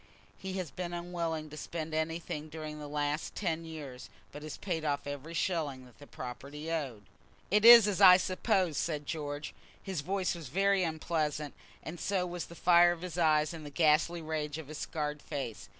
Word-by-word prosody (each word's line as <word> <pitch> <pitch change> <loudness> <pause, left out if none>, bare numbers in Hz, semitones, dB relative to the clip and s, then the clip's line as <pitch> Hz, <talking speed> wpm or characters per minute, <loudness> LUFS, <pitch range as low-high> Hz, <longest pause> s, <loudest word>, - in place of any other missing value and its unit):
He 190 -1 -5
has 185 -5 -4
been 175 -1 -5
unwilling 170 -3 -3
to 155 - -8
spend 160 0 -5
anything 155 -1 -3
during 155 -1 -7
the 150 - -7
last 145 +1 -2
ten 165 -4 -2
years, 145 -6 -8 0.2
but 145 - -9
has 155 0 -7
paid 170 -5 -3
off 145 -2 -1
every 145 +3 -6
shilling 150 -8 -1
that 125 - -19
the 145 - -13
property 140 +6 -7
owed." 135 -10 -3 0.5
"It 210 +1 +4
is 235 -3 +11
as 205 -1 -1
I 180 -2 +10
supposed," 185 -3 0
said 150 -3 -2
George. 145 -1 -4 0.3
His 190 -7 -3
voice 190 +3 -1
was 170 -4 -8
very 195 +6 +2
unpleasant, 155 -3 -1 0.3
and 165 +2 -7
so 190 -2 0
was 175 -1 -5
the 170 - -12
fire 175 0 +6
of 170 0 -10
his 180 -1 -5
eyes 155 -2 +3
and 160 -2 -8
the 145 - -7
ghastly 160 +3 +2
rage 155 -1 -3
of 155 -3 -8
his 155 - -7
scarred 150 -1 -3
face. 135 -6 -5
160 Hz, 190 wpm, -31 LUFS, 150-175 Hz, 0.5 s, is